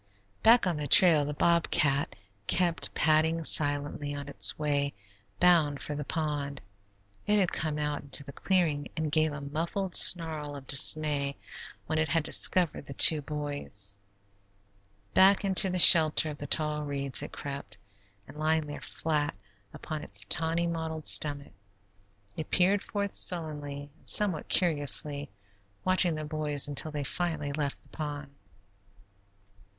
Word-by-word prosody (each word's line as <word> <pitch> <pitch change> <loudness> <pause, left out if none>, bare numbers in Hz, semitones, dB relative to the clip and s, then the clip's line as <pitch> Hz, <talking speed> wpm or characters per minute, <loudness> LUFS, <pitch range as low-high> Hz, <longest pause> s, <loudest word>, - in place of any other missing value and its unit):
Back 235 0 +4
on 175 -4 -2
the 150 -1 -5
trail 155 -1 +6
the 145 0 -6
bobcat 150 -5 -1 0.3
kept 170 -2 0
padding 160 +2 0
silently 145 -1 0
on 140 0 -9
its 140 - -1
way 145 -2 -3 0.4
bound 165 -5 +2
for 150 - -6
the 150 0 -6
pond. 145 -2 -5 0.7
It 210 0 +1
had 190 -4 0
come 155 -1 -4
out 150 -1 -4
into 140 0 -1
the 140 - -12
clearing, 160 -5 -2
and 155 -1 -4
gave 155 0 0
a 145 -1 -8
muffled 170 +6 -5
snarl 155 -4 +3
of 140 -1 -12
dismay 140 0 +4 0.5
when 155 0 -3
it 155 -1 -2
had 160 +2 -1
discovered 170 -3 +1
the 140 - -9
two 155 -2 +7
boys. 145 -9 -2 1.2
Back 195 +2 +3
into 190 0 +4
the 185 - -3
shelter 160 -3 +5
of 145 - -12
the 145 - -8
tall 150 -1 0
reeds 140 -2 -4
it - - -9
crept, 140 -7 -9 0.5
and 140 - -15
lying 155 0 -1
there 145 0 -10
flat 150 -2 -4 0.4
upon 155 -1 -8
its 100 -6 +1
tawny 165 +8 -1
mottled 160 -2 -6
stomach, 145 -5 +4 0.8
it 155 - -8
peered 190 +3 0
forth 200 -1 -5
sullenly 145 -4 +3
and - - -3
somewhat 190 -7 -1
curiously, 145 -4 0 0.6
watching 185 -3 +1
the 155 0 -7
boys 150 -2 -2
until 145 +2 -5
they 150 -1 -6
finally 150 -1 -4
left 145 -1 -5
the - - -27
pond. 145 -2 -8
150 Hz, 145 wpm, -27 LUFS, 145-165 Hz, 1.2 s, two